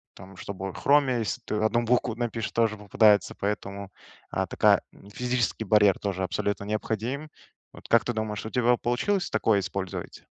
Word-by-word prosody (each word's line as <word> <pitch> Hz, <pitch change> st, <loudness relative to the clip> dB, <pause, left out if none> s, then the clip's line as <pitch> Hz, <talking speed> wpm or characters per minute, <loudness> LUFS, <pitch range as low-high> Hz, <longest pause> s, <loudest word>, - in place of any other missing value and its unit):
там, 95 Hz, 0 st, -13 dB
чтобы 95 Hz, -1 st, -6 dB
в -, -, -10 dB
хроме, 140 Hz, -4 st, +3 dB
если 110 Hz, -, -3 dB
ты -, -, -4 dB
одну 110 Hz, +2 st, +1 dB
букву 120 Hz, -1 st, +1 dB
напишешь, 115 Hz, -2 st, -3 dB
тоже 115 Hz, -2 st, +1 dB
попадается, 105 Hz, -1 st, +3 dB
поэтому, 100 Hz, -1 st, -4 dB, 0.4 s
э, -, -, 0 dB
такая -, -, +4 dB, 0.3 s
физический 125 Hz, -1 st, -1 dB
барьер 105 Hz, -1 st, +4 dB
тоже 95 Hz, -2 st, -2 dB
абсолютно 100 Hz, +2 st, -2 dB
необходим. 115 Hz, +7 st, -3 dB, 0.4 s
Вот -, -, -13 dB
как 115 Hz, -2 st, +4 dB
ты 120 Hz, -, -1 dB
думаешь, 110 Hz, -2 st, -3 dB
у 110 Hz, -, -4 dB
тебя 125 Hz, -1 st, +2 dB
б -, -, +1 dB
получилось 180 Hz, +11 st, 0 dB
такое 110 Hz, -1 st, +2 dB
использовать? 95 Hz, -1 st, -5 dB
110 Hz, 170 wpm, -26 LUFS, 100-120 Hz, 0.4 s, такая